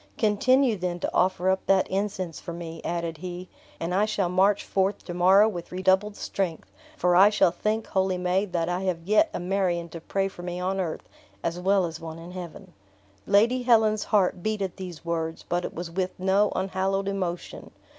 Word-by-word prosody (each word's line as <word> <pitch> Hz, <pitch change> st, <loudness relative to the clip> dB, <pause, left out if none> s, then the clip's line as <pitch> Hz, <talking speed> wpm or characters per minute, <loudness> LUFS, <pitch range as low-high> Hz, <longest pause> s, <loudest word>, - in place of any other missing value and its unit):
Continue, 235 Hz, +3 st, +3 dB
then, 175 Hz, -1 st, -3 dB
to -, -, -2 dB
offer 185 Hz, 0 st, +1 dB
up 190 Hz, -, -1 dB
that 195 Hz, -1 st, +4 dB
incense 190 Hz, -4 st, -3 dB
for 170 Hz, -, -7 dB
me," 165 Hz, -1 st, -7 dB
added 170 Hz, -1 st, -3 dB
he, 180 Hz, +1 st, -7 dB, 0.3 s
"and 170 Hz, +2 st, -3 dB
I 200 Hz, +3 st, +3 dB
shall 205 Hz, -4 st, -1 dB
march 190 Hz, +3 st, +3 dB
forth 195 Hz, +1 st, 0 dB
to 175 Hz, -, -5 dB
morrow 190 Hz, +4 st, +5 dB
with 175 Hz, -6 st, -5 dB
redoubled 190 Hz, +3 st, +2 dB
strength; 185 Hz, -6 st, -3 dB, 0.3 s
for 180 Hz, 0 st, +2 dB
I 195 Hz, +3 st, +8 dB
shall 210 Hz, -4 st, +3 dB
think, 215 Hz, +4 st, -1 dB
holy 190 Hz, -1 st, 0 dB
maid, 180 Hz, +2 st, 0 dB
that 165 Hz, -2 st, 0 dB
I 180 Hz, +1 st, -1 dB
have 170 Hz, -3 st, -1 dB
yet 215 Hz, -, +3 dB
a -, -, -4 dB
Marion 175 Hz, -2 st, -1 dB
to 165 Hz, 0 st, -8 dB
pray 195 Hz, +3 st, -1 dB
for 190 Hz, -2 st, -10 dB
me 175 Hz, 0 st, -4 dB
on 190 Hz, +2 st, -1 dB
earth 170 Hz, -4 st, -4 dB, 0.4 s
as 170 Hz, +1 st, -2 dB
well 190 Hz, 0 st, +2 dB
as 165 Hz, -1 st, -6 dB
one 160 Hz, 0 st, -7 dB
in 170 Hz, +2 st, -10 dB
heaven." 180 Hz, -3 st, -9 dB, 0.5 s
Lady 235 Hz, +5 st, +4 dB
Helen's 220 Hz, -3 st, +3 dB
heart 190 Hz, -4 st, +2 dB
beat 215 Hz, +1 st, -1 dB
at 190 Hz, -2 st, -5 dB
these 180 Hz, -4 st, -8 dB
words, 165 Hz, -1 st, -3 dB
but 175 Hz, 0 st, -1 dB
it -, -, -5 dB
was 170 Hz, 0 st, -5 dB
with 185 Hz, +1 st, -3 dB
no 195 Hz, +2 st, +2 dB
unhallowed 195 Hz, +1 st, -1 dB
emotion. 185 Hz, -3 st, -4 dB
185 Hz, 195 wpm, -26 LUFS, 175-200 Hz, 0.5 s, I